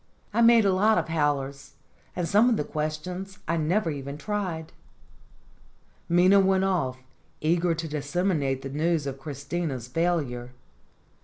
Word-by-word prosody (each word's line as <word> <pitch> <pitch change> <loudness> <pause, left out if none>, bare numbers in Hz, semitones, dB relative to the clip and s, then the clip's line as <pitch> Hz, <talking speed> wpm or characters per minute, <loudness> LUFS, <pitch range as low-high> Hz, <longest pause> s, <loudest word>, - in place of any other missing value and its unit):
I 235 - +2
made 230 -2 +6
a 195 - +3
lot 215 +4 +3
of - - -1
howlers, 140 -3 -1 0.4
and 175 -2 -1
some 210 +6 +4
of 230 - +2
the - - 0
questions 180 +6 -4
I 165 - +1
never 165 +3 +1
even 140 0 -6
tried." 170 -2 -4 1.4
Minna 180 +3 +5
went 190 0 +3
off, 165 -10 0 0.4
eager 170 +2 +1
to 165 0 -4
disseminate 145 -2 -1
the 135 - -5
news 155 +2 0
of 135 -1 -5
Christina's 140 -2 -4
failure. 130 -5 -1
165 Hz, 140 wpm, -26 LUFS, 145-185 Hz, 1.4 s, made